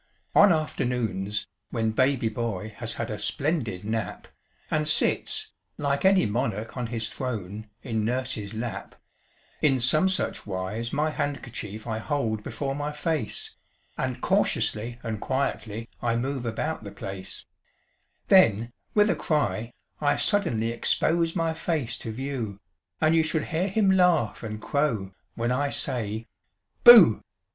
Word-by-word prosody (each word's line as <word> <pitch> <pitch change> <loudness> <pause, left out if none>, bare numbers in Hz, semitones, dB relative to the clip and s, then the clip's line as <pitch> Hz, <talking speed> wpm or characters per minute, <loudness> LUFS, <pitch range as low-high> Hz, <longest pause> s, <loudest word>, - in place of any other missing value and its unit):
On 205 -1 +7
afternoons, 120 - -1 0.2
when 110 -2 0
baby 130 +1 +2
boy 110 -2 -3
has 115 -1 -4
had 115 -1 -4
a 105 - -4
splendid 140 - -1
nap, 110 0 -3 0.4
And 155 -1 +1
sits, 150 - +1 0.3
like 140 -1 0
any 190 -1 +5
monarch 110 0 -2
on 125 -2 -2
his 115 -1 -3
throne, 110 -4 -5
in 110 -4 -1
nurse's 120 -3 -2
lap, 115 +1 -5 0.7
In 135 -4 +3
some 155 +9 +3
such 185 - -1
wise 100 +5 -3
my 155 +1 +1
handkerchief 120 -8 -4
I 110 -2 -2
hold 110 -5 -1
before 135 +5 -3
my 145 +1 -3
face, 150 -5 -2 0.4
And - - -3
cautiously 115 +3 +1
and 110 -2 -4
quietly 115 -4 -2
I 115 -1 +1
move 130 0 -2
about 135 +5 -2
the 100 - -7
place; 95 -1 -8 0.8
Then, 120 - +5 0.2
with 210 0 +5
a - - +2
cry, 115 - -1 0.3
I 145 -1 +2
suddenly 120 - +1
expose 165 +7 +1
my 165 -2 +1
face 160 -7 -2
to 110 - -6
view, 120 -5 -4 0.4
And 155 +1 +3
you 165 - +5
should 160 -1 -1
hear 175 +4 +1
him 200 0 +3
laugh 180 - +3
and 110 -2 -5
crow 115 -8 -1 0.2
when 120 +1 -1
I 140 +3 +1
say 115 -6 -2 0.6
"Booh"! 480 - +10
120 Hz, 140 wpm, -26 LUFS, 110-150 Hz, 0.8 s, Booh